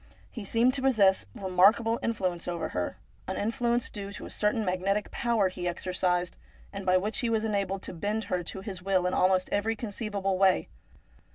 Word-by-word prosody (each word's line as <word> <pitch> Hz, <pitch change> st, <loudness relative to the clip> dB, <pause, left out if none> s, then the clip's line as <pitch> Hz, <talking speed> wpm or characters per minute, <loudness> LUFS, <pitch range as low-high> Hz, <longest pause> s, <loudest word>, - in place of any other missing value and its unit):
He 225 Hz, -, -7 dB
seemed 235 Hz, +5 st, +3 dB
to 270 Hz, -, -2 dB
possess 205 Hz, -, +3 dB
remarkable 200 Hz, +5 st, +3 dB
influence 185 Hz, -7 st, -2 dB
over 175 Hz, -2 st, -2 dB
her, 90 Hz, -1 st, -3 dB, 0.3 s
an -, -, -3 dB
influence 235 Hz, +2 st, 0 dB
due 200 Hz, -1 st, -7 dB
to -, -, -7 dB
a -, -, -9 dB
certain 210 Hz, +1 st, +1 dB
magnetic 195 Hz, +3 st, 0 dB
power 230 Hz, -5 st, +1 dB
he 180 Hz, -1 st, -4 dB
exercised, 180 Hz, 0 st, -1 dB, 0.4 s
and 195 Hz, -1 st, -6 dB
by 185 Hz, 0 st, +5 dB
which 205 Hz, +3 st, 0 dB
he 240 Hz, -, 0 dB
was 225 Hz, -1 st, +1 dB
enabled 200 Hz, -2 st, -1 dB
to -, -, -3 dB
bend 205 Hz, +6 st, -2 dB
her 180 Hz, -2 st, -1 dB
to 190 Hz, -, -6 dB
his 190 Hz, -2 st, -6 dB
will 185 Hz, -1 st, +1 dB
in 180 Hz, -, 0 dB
almost 185 Hz, 0 st, +3 dB
every 220 Hz, +2 st, +1 dB
conceivable 200 Hz, -3 st, -2 dB
way. 190 Hz, -1 st, +3 dB
195 Hz, 185 wpm, -28 LUFS, 185-220 Hz, 0.4 s, by